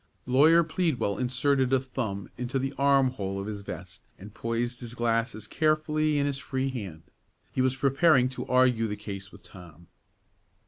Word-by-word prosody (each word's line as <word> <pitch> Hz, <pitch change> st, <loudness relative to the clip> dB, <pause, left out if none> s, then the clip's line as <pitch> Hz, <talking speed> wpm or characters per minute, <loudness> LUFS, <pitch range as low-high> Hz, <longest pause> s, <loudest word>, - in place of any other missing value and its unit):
Lawyer 155 Hz, +7 st, +5 dB
Pleadwell 155 Hz, -, -1 dB
inserted 130 Hz, +1 st, +1 dB
a 135 Hz, -, +4 dB
thumb 120 Hz, -7 st, -4 dB
into 125 Hz, +2 st, -3 dB
the 135 Hz, +1 st, -2 dB
arm 140 Hz, -2 st, +3 dB
hole 100 Hz, -5 st, -4 dB
of 100 Hz, -, -4 dB
his 105 Hz, -1 st, -5 dB
vest, 90 Hz, -2 st, -8 dB, 0.2 s
and 105 Hz, +2 st, -12 dB
poised 120 Hz, +2 st, -2 dB
his 120 Hz, -1 st, -8 dB
glasses 115 Hz, -2 st, -1 dB
carefully 155 Hz, +2 st, +1 dB
in 140 Hz, -, +1 dB
his 140 Hz, -1 st, -2 dB
free 135 Hz, -1 st, -2 dB
hand. 95 Hz, -10 st, -7 dB, 0.5 s
He 130 Hz, -, -1 dB
was 130 Hz, 0 st, +2 dB
preparing 135 Hz, 0 st, +4 dB
to 130 Hz, -, -6 dB
argue 125 Hz, -3 st, +3 dB
the 105 Hz, -, -3 dB
case 100 Hz, -2 st, -8 dB
with 100 Hz, -, -15 dB
Tom. 85 Hz, -2 st, -14 dB
125 Hz, 170 wpm, -27 LUFS, 105-135 Hz, 0.5 s, Lawyer